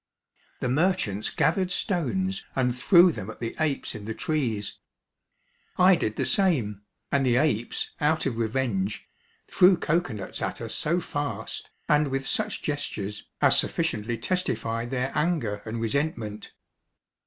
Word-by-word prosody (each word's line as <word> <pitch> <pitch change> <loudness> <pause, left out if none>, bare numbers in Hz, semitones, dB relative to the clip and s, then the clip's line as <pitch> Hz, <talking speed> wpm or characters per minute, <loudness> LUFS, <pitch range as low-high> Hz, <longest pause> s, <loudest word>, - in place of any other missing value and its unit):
The - - 0
merchants 130 - +1
gathered 180 +3 +1
stones 190 +2 -1
and 125 -2 +1
threw 175 +7 +6
them 105 -8 -6
at 110 - -9
the 115 -1 -4
apes 155 -3 0
in 105 -3 -8
the 110 0 -4
trees. 115 -11 -2 1.0
I 185 +1 +7
did 110 -9 -2
the - - 0
same, 145 - +1 0.3
and 140 -1 +3
the 125 -2 +3
apes, 125 -5 0
out 155 +2 +2
of 120 -4 -1
revenge, 110 -4 -1 0.4
threw 180 0 +5
cocoa 165 -4 0
nuts 100 -3 -6
at - - -2
us - - -5
so 170 +4 0
fast, 145 -2 -4 0.2
and 150 0 +4
with 135 0 -2
such 215 -1 -2
gestures, 105 -9 -4 0.2
as - - +6
sufficiently 110 +2 -1
testified 115 -7 -2
their 130 +1 -1
anger 150 -11 0
and 115 +1 -4
resentment. 115 -4 -2
135 Hz, 140 wpm, -26 LUFS, 110-165 Hz, 1.0 s, I